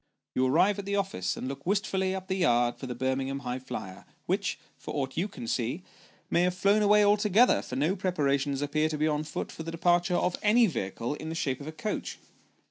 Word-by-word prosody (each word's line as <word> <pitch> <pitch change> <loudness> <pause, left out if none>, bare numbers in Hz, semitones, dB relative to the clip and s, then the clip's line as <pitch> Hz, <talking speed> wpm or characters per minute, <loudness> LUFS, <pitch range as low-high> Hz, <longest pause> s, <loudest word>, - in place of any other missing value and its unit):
You 130 0 +2
arrive 185 +9 +3
at 200 - -5
the 200 0 -1
office, 190 - -1
and - - -4
look 135 +1 -6
wistfully 190 -1 0
up 190 0 -6
the 190 - -1
yard 120 -8 +2
for 130 - -6
the 125 - -4
Birmingham 135 +1 -1
High 125 -1 -3
flier, 95 -7 -7 0.2
which, - - -1 0.2
for - - -7
aught 135 -2 -2
you 175 +5 0
can 120 - -8
see, 125 +10 -2 0.4
may 170 - +2
have 180 0 +1
flown 200 +3 +3
away 210 0 +5
altogether, 210 +3 +4
for 125 - -7
no 155 +8 +1
preparations 145 -7 0
appear 155 +2 +1
to 155 - -3
be 155 +1 +1
on 150 0 0
foot 155 - -5
for - - -8
the 165 - -5
departure 175 +2 +2
of 180 0 +1
any 225 +3 +5
vehicle 115 - -3
in 155 +1 -6
the 165 - -4
shape 135 -5 -2
of 140 - -8
a - - -4
coach. 160 +7 -4
160 Hz, 220 wpm, -28 LUFS, 135-190 Hz, 0.4 s, away